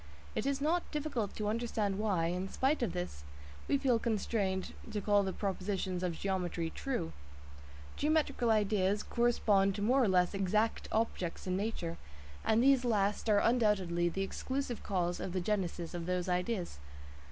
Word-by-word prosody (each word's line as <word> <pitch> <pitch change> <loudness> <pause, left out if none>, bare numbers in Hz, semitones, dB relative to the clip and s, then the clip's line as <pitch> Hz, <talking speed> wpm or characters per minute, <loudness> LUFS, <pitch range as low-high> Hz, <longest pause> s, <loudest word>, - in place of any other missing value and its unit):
It 250 - -1
is 280 0 0
not 335 +4 +1
difficult 285 -9 -2
to 210 - -2
understand 215 -3 -1
why, 195 -6 +1
in 180 +3 -2
spite 270 +7 +1
of 230 -7 0
this, 175 - -5 0.4
we 280 - +3
feel 260 -4 +2
constrained 205 -4 -1 0.2
to 215 -1 -2
call 205 0 +3
the 190 -1 -1
propositions 190 -2 -2
of 175 -3 -2
geometry 180 -4 -2
"true." 250 - -3 0.8
Geometrical 295 -5 +1
ideas 205 -2 +2
correspond 210 -5 +2
to 205 - -3
more 255 +5 +4
or - - +3
less 180 -1 +3
exact 205 +3 0
objects 215 -6 -1
in 185 -1 0
nature, 190 -5 -2 0.5
and 225 +2 +3
these 270 -1 +5
last 210 -2 +1
are 210 - +5
undoubtedly 195 -8 +2
the 195 +3 -2
exclusive 260 +4 -3
cause 175 -3 -1
of 180 - -4
the 185 - 0
genesis 180 -3 -2
of 170 -1 -4
those 180 0 -1
ideas. 180 - -1
205 Hz, 160 wpm, -33 LUFS, 180-230 Hz, 0.8 s, these